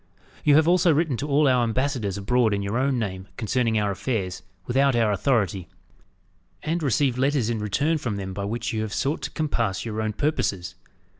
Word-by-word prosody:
You 145 - +5
have 155 +1 +5
also 175 0 +4
written 155 -2 +1
to 145 - -3
all 145 +1 +3
our 125 -2 +4
ambassadors 120 -4 -1
abroad 110 +1 +2
in 100 - -3
your 100 +3 -3
own 135 0 +1
name 95 -4 -4
concerning 115 0 0
our 105 -1 +1
affairs, 95 -4 -3 0.2
without 135 +3 +2
our 115 -3 +2
authority; 100 -5 0 1.0
and 165 +2 -1
received 135 -3 +1
letters 135 -4 +1
in 115 - -2
return 145 +10 0
from 115 -7 -3
them 95 -1 -5
by 100 +1 -4
which 115 +3 -3
you 110 - -1
have 110 -1 -4
sought 140 +5 -1
to - - -4
compass 100 -11 -2
your 110 -1 -3
own 110 -1 -2
purposes. 100 - -1
120 Hz, 195 wpm, -24 LUFS, 100-140 Hz, 1.0 s, You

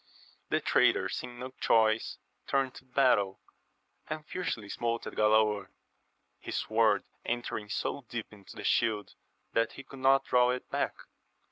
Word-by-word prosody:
The - - +2
traitor - - +3
seeing 120 0 -5
no 130 +1 -6
choice 110 -1 +3 0.3
turned 135 -2 +1
to - - -13
battle, 125 -7 +2 0.7
and 155 0 -4
fiercely 150 - -3
smote 115 +2 -2
at - - -6
Galaor, 105 -2 +3 0.7
his - - -4
sword 110 -2 +2 0.2
entering 120 -3 -3
so 130 - -2
deep 115 -2 -5
into 100 -2 -13
the - - -7
shield 110 -3 +1 0.4
that 115 0 +1
he 135 - -9
could 135 0 -12
not 135 +1 +4
draw 125 0 +4
it 125 0 -2
back. - - 0
115 Hz, 145 wpm, -30 LUFS, 110-130 Hz, 0.7 s, not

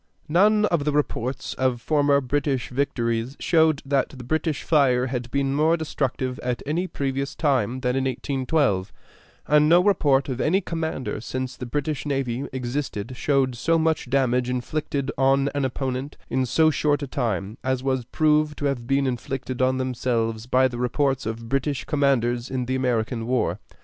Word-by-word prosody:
None 210 +7 +4
of 170 -7 +1
the 150 - +1
reports 135 -3 -2
of 130 -2 0
former 145 +2 +2
British 135 0 -1
victories 120 -1 -1
showed 160 -3 +3
that 135 -1 +1
the 130 -3 -10
British 155 +3 -1
fire 130 -5 +3
had 125 -2 -4
been 135 +1 0
more 155 +4 +3
destructive 130 -4 -2
at 125 -1 -3
any 170 +6 -1
previous 135 -3 -3
time 130 -4 0
than 125 -1 0
in 135 0 0
1812, 130 - 0 0.5
and 150 +1 +4
no 170 +2 +7
report 145 -9 +3
of 130 -2 -3
any 185 +5 +3
commander 160 - -3
since 130 +1 -4
the 125 - -7
British 145 +3 -2
navy 135 -1 -1
existed 125 -3 -4
showed 135 -1 +1
so 165 +7 +1
much 160 -5 0
damage 125 -2 +1
inflicted 140 +2 -2
on 135 +1 +3
an 140 -1 0
opponent 130 +1 -3
in 130 +1 +1
so 155 +5 +4
short 145 -1 +1
a - - -3
time 110 - -2
as 130 0 -1
was 130 -2 0
proved 150 +2 +2
to 145 - -3
have 130 -4 -1
been 135 +1 +2
inflicted 130 0 -3
on 130 0 +2
themselves 120 -3 -1
by 130 +1 +4
the 120 -2 -6
reports 130 +1 0
of 115 +1 -5
British 135 +2 -1
commanders 125 -5 +1
in 130 -1 -2
the 130 - -2
American 120 -2 -1
war. 125 -1 0
135 Hz, 170 wpm, -24 LUFS, 125-145 Hz, 0.5 s, no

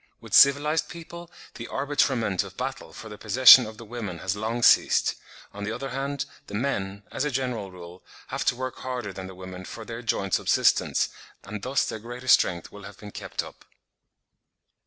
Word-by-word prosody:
With - - -12
civilised 145 +3 +5
people 170 0 -10 0.2
the 115 - -8
arbitrament 135 -8 0
of 95 -1 -12
battle 135 +2 -5
for 110 - -10
the 105 -1 -10
possession 125 +2 +8
of 110 0 -10
the 115 - -10
women 105 -6 -6
has 95 +3 -2
long 115 +3 -3
ceased; - - +5 0.4
on 100 0 -7
the 105 - -3
other 130 +4 -5
hand, 140 +1 -3 0.2
the 100 - -7
men, 100 -5 -2
as - - -2
a 150 - 0
general 125 -6 -3
rule, 90 0 -12 0.3
have - - -2
to - - +2
work 130 0 -5
harder 125 -6 -5
than 95 -1 -7
the 95 - -10
women 95 0 -9
for 110 +4 -9
their 115 +1 -7
joint 100 -4 -2
subsistence, - - +2 0.3
and 105 0 -7
thus 130 +5 0
their 110 - -5
greater 120 +3 -9
strength 85 -8 +3
will 105 - -11
have 100 0 -11
been 105 -1 -10
kept - - -5
up. - - -13
115 Hz, 190 wpm, -26 LUFS, 100-130 Hz, 0.4 s, possession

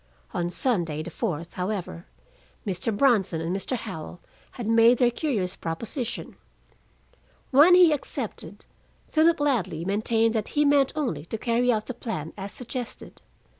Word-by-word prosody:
On 175 0 -1
Sunday, 175 - 0
the 175 - -7
fourth, 170 -5 -3
however, 180 - -4 0.6
Mr. 190 +3 -1
Bronson 205 -11 +3
and 165 +3 -2
Mr. 200 +6 -2
Howell 175 -5 -7 0.3
had 240 - -6
made 230 +2 +5
their 245 0 +3
curious 220 - -2
proposition. 230 - -5 1.1
When 300 +7 +7
he 360 -3 +7
accepted, 290 - -5 0.4
Philip 325 +1 +3
Ladley 235 - 0
maintained 225 +3 +1
that 220 -2 -1
he 295 - +5
meant 285 -1 +4
only 245 - -2
to 225 - -4
carry 240 +2 +1
out 215 -2 -1
the 255 - -5
plan 165 -10 -5
as 195 0 -6
suggested. 250 -1 -7
225 Hz, 140 wpm, -26 LUFS, 180-255 Hz, 1.1 s, When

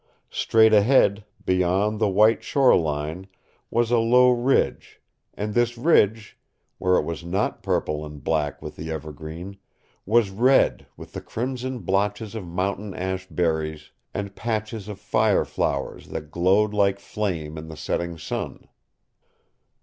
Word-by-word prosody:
Straight 110 -1 +4
ahead, 105 -2 +4 0.2
beyond 95 +4 +1
the 110 -2 +2
white 105 +4 +4
shore 135 -2 +4
line, 80 +3 -2 0.4
was 120 0 +1
a 120 - +4
low 125 +2 +5
ridge, 125 +2 0 0.4
and 105 0 -3
this 120 +1 +1
ridge 110 -7 +2 0.4
where 90 0 +3
it - - +2
was 85 0 -5
not 95 +4 -1
purple 75 0 -1
and 75 -2 -10
black 75 -3 -1
with - - -8
the 80 - -6
evergreen 80 +5 -7 0.5
was 110 -2 +3
red 125 +7 +3
with - - -12
the - - -5
crimson 125 +1 -4
blotches 105 +3 -1
of 110 -6 -6
mountain 95 +2 -3
ash 95 0 -3
berries, 80 -3 -2 0.2
and 100 -1 -5
patches 110 -2 -3
of 105 -2 -7
fire 110 -2 +2
flowers - - -3
that 75 0 -7
glowed 95 +5 +2
like 100 -1 +2
flame 85 -9 -3
in 80 0 -8
the 80 -1 -9
setting 85 +1 -3
sun. 80 - -5
100 Hz, 140 wpm, -24 LUFS, 85-110 Hz, 0.5 s, low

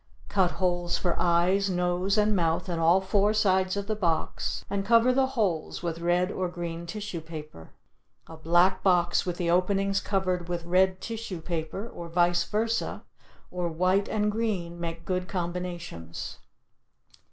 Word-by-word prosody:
Cut 185 -3 +2
holes 175 -2 0
for 175 -2 0
eyes, 180 +3 +3
nose 180 +2 0
and 210 0 +3
mouth 165 -1 +1
in 170 -2 -2
all 170 +3 +4
four 200 +2 +2
sides 190 -2 +2
of 200 - -2
the 215 +1 -1
box 170 -6 -1
and 200 -1 -2
cover 230 +4 +5
the 265 0 +3
holes 180 -9 -1
with 170 -1 -3
red 175 +2 +1
or 185 -3 -2
green 170 -1 -5
tissue 200 -2 -5
paper. 155 - -9 0.6
A 165 - -11
black 175 +4 +3
box 175 -2 +2
with 175 -1 -2
the 170 -2 0
openings 195 +2 +2
covered 185 -3 -1
with 170 -1 -3
red 185 +1 +2
tissue 225 -6 -5
paper 165 +5 -4
or 170 -7 -8
vice 175 +1 +3
versa 225 +2 -1 0.5
or 180 -1 -2
white 185 +4 +1
and 210 -1 +1
green 195 -6 -2
make 165 0 -5
good 185 -1 -1
combinations. 175 - -5
180 Hz, 155 wpm, -27 LUFS, 170-195 Hz, 0.6 s, cover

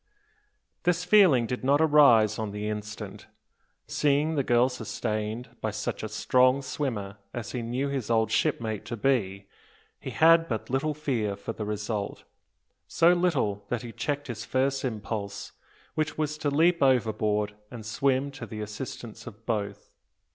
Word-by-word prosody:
This 175 -1 +1
feeling 180 - +6
did 125 +2 -4
not 140 +2 +4
arise 140 -9 +5
on 110 -1 -2
the 105 +1 -4
instant. 105 0 -6 0.6
Seeing 150 +2 +1
the 145 - +1
girl 120 -1 +3
sustained 110 -2 -3
by - - 0
such - - -3
a 110 - -4
strong 130 +5 +3
swimmer 125 -7 -3 0.2
as 120 -1 -5
he 125 - -3
knew 125 +4 -2
his 135 -5 -3
old 110 -1 +2
shipmate 110 -2 0
to 120 - -5
be, 100 -6 0 0.5
he - - -6
had 165 +1 +5
but 110 0 -4
little 145 +3 0
fear 120 -9 -1
for 100 +3 -6
the 110 - -5
result, 105 0 -3 0.6
so 170 +2 +4
little 140 - 0
that 120 -1 -2
he 120 - -7
checked 140 +5 -3
his 115 -4 -5
first 130 +3 0
impulse, 105 -4 -4 0.4
which 155 -1 -2
was 150 -1 -1
to 150 - 0
leap 165 +4 +3
overboard 110 -5 +2 0.2
and 115 -3 -9
swim 135 +4 +1
to 135 - -8
the 110 - -7
assistance 110 +2 -7
of 115 0 -11
both. 105 -3 -3
120 Hz, 155 wpm, -27 LUFS, 110-140 Hz, 0.6 s, feeling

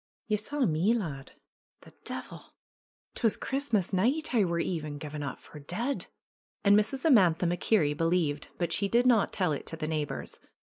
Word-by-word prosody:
^^Ye 210 - +3
saw 280 +5 -1
me, 180 +6 +2
lad? 145 - -5 0.5
The - - -16
de'il! - - -7 0.6
'Twas 225 -3 +1
Christmas 235 -9 -1
night 260 +12 +1
I 225 -4 +4
war 170 -2 0
e'en 155 -4 -3
gi'en 150 0 -6
up 140 -3 -5
for 150 - -13
deid." 225 - -3 0.6
And 200 0 +6
Mrs. 220 +7 +1
Amantha 185 - +5
MacKerrie 175 -3 +2
believed, 165 -2 0
but 170 -2 -1
she 200 - +1
did 240 +3 +3
not 235 -5 +4
tell 185 -5 +1
it 145 - -4
to 160 - -6
the 155 -1 -3
neighbors. 155 -2 -3
180 Hz, 170 wpm, -29 LUFS, 155-225 Hz, 0.6 s, And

